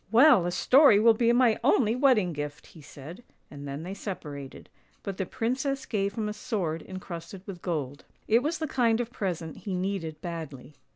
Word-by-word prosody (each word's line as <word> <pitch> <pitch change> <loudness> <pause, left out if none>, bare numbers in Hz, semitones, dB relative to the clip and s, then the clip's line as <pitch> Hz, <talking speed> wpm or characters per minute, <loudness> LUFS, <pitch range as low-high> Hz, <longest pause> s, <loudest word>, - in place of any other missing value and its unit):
" - - -34
Well, 240 - +6
a - - -1
story 255 - +5
will 225 +1 +6
be 230 +1 +2
my 240 -2 +3
only 235 -4 +3
wedding 250 - +3
gift! 145 0 -6
" - - -20
he 160 - -13
said, 150 - -11 0.3
and 145 -1 -8
then 140 +3 -5
they 185 +3 -6
separated: 150 -9 -7 0.4
but 195 -2 -5
the 190 - -3
princess 265 +4 -2
gave 200 -2 -2
him 220 -2 -2
a 210 - -3
sword 190 -9 -3
en 190 - -7
crusted 180 +2 -9
with 185 -4 -8
gold. 145 -6 -4 0.2
It 230 +2 +4
was 305 +5 -1
the 315 - -3
kind 235 -4 +2
of 240 -1 -3
present 170 -7 -4
he 195 -3 -5
needed 180 -4 -3
badly. 155 -5 -7
195 Hz, 205 wpm, -27 LUFS, 165-235 Hz, 0.4 s, Well